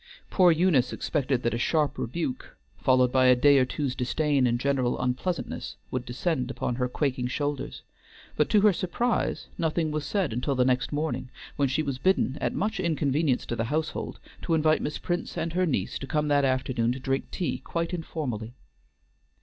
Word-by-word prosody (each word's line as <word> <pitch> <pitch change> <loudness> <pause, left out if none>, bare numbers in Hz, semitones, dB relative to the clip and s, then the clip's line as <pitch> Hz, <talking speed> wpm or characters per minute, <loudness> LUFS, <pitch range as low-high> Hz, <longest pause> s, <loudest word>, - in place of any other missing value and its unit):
Poor 180 -3 +6
Eunice 160 -7 +3
expected 135 -4 -1
that 120 - +1
a 115 - -1
sharp 150 +3 +1
rebuke, 135 0 -4 0.2
followed 130 -1 +3
by 130 0 +4
a 125 - +7
day 140 +2 +5
or 130 - +4
two's 135 0 -2
disdain 135 +1 +1
and 120 0 +1
general 130 -2 0
unpleasantness, 130 +8 -2 0.2
would 125 -1 -2
descend 130 +1 -1
upon 130 - -2
her 125 -1 0
quaking 130 -2 -1
shoulders; 145 +1 -3 0.5
but, - - +2
to 210 - +4
her 210 -1 +5
surprise, 225 +8 -1
nothing 160 -1 0
was 150 -1 -2
said 175 - -1
until 125 +4 -1
the 125 -1 +3
next 125 -1 +1
morning, 145 -4 -2 0.3
when 140 - +2
she 150 +4 0
was 140 -3 -3
bidden, 185 -6 +2
at - - 0
much 215 0 -1
inconvenience 150 -5 +1
to 120 - -3
the 115 - -1
household, 155 +6 -2 0.2
to 165 - +1
invite 155 0 +3
Miss 150 - -3
Prince 175 0 -3
and 165 - -2
her 185 0 +2
niece 105 - -1
to 135 - -6
come 150 0 0
that 145 -1 +3
afternoon 130 -3 +1
to 130 - -6
drink 135 +1 -2
tea 180 - -2
quite 170 +1 -3
informally. 130 -9 -4
140 Hz, 185 wpm, -27 LUFS, 125-160 Hz, 0.5 s, a